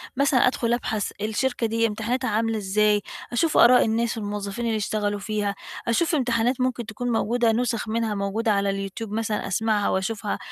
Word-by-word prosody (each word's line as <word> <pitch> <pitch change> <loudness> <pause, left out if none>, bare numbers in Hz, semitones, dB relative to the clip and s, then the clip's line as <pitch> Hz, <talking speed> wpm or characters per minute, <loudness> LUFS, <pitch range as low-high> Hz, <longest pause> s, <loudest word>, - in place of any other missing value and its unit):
مثلًا 270 -2 +3
أدخُل 240 -2 0
أبحث 220 -4 -2
الشركة 230 +2 0
دي 230 +1 +1
امتحاناتها 230 +4 -2
عاملة 225 +1 0
إزاي 210 +1 +2 0.3
أشوف 305 +7 +1
آراء 250 +1 +7
الناس 230 +1 0
والموظفين 205 +2 -4
اللي 225 -1 0
اشتغلوا 205 -1 -1
فيها، 205 -1 -2 0.3
أشوف 320 +8 +2
امتحانات 245 -1 +1
ممكن 250 -2 -1
تكون 240 +3 -4
موجودة 230 +1 +2
نُسخ 235 -1 -1
منها 225 -1 -1
موجودة 205 +3 0
على 200 0 +1
اليوتيوب 195 +2 -4
مثلًا 215 -1 -2
أسمعها 215 +1 +1
وأشوفها 205 +2 -2
225 Hz, 160 wpm, -24 LUFS, 210-240 Hz, 0.3 s, آراء